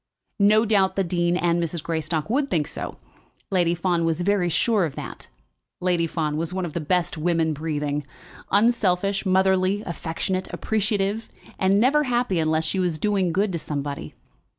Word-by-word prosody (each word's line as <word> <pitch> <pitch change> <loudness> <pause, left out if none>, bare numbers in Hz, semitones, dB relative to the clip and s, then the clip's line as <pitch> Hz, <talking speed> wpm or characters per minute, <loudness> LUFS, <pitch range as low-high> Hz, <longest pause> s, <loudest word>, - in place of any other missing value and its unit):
No 215 +2 +5
doubt 200 -3 +2
the 195 - +1
dean 175 0 +1
and 175 -1 +1
Mrs. 170 -1 -3
Greystock 160 -1 -2
would 275 +5 0
think 155 - +1
so; - - -5 0.5
Lady 175 -3 +2
Fawn 175 -1 0
was 165 +1 0
very 190 -1 +2
sure 215 +4 +2
of 155 -5 -3
that. - - -8 0.5
Lady 175 -2 +1
Fawn 155 -2 -2
was 165 +1 -2
one 185 0 -2
of 160 - -6
the - - -2
best 170 +1 0
women 165 -1 +1
breathing, 150 -1 -2 0.5
unselfish, 200 -3 +2
motherly, 190 +1 +2
affectionate, 175 +3 -3
appreciative, 210 0 -1 0.3
and 195 +1 +3
never 290 +6 +3
happy 240 -7 +1
unless 160 0 +1
she 175 +4 -1
was 175 -4 0
doing 195 -1 +1
good 195 +4 +1
to 170 - -2
somebody. 145 - -5
180 Hz, 165 wpm, -24 LUFS, 165-200 Hz, 0.5 s, No